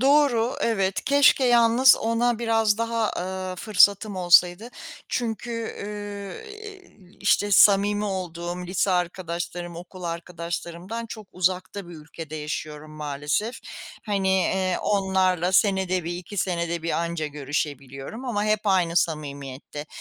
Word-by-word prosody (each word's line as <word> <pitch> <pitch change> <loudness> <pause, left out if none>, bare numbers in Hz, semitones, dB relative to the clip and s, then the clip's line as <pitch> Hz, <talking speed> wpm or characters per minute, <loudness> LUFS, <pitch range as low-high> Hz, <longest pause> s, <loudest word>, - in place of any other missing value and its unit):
Doğru, 265 -3 +3
evet. 195 -4 0
Keşke 280 -1 +5
yalnız 240 +1 +6
ona 230 +1 0
biraz 225 -2 +2
daha, 230 -1 0
ııı, 185 0 -4
fırsatım 205 0 +3
olsaydı. 180 +5 +4 0.4
Çünkü, 230 -1 -3
ııı, 205 - -7
iii, 400 - -13
işte, 205 0 +2
samimi 205 +1 +5
olduğum 180 -2 -4
lise 190 +2 0
arkadaşlarım, 175 -1 -3
okul 180 +1 -10
arkadaşlarımdan 170 +5 -5
çok 215 -1 -9
uzakta 185 +1 -1
bir 175 - -10
ülkede 155 0 -9
yaşıyorum, 150 0 -5
maalesef. 150 - -3 0.5
Hani, 190 -2 +1
ııı, 185 -1 0
onlarla 190 -3 +1
senede 190 -3 +2
1-2, 175 +4 -6
senede 170 -2 -1
1 165 - -2
anca 170 -2 -1
görüşebiliyorum 145 - -5
ama 210 -4 -1
hep 215 -1 +2
aynı 180 -4 +2
samimiyette. 145 -2 -3
185 Hz, 115 wpm, -25 LUFS, 170-215 Hz, 0.5 s, yalnız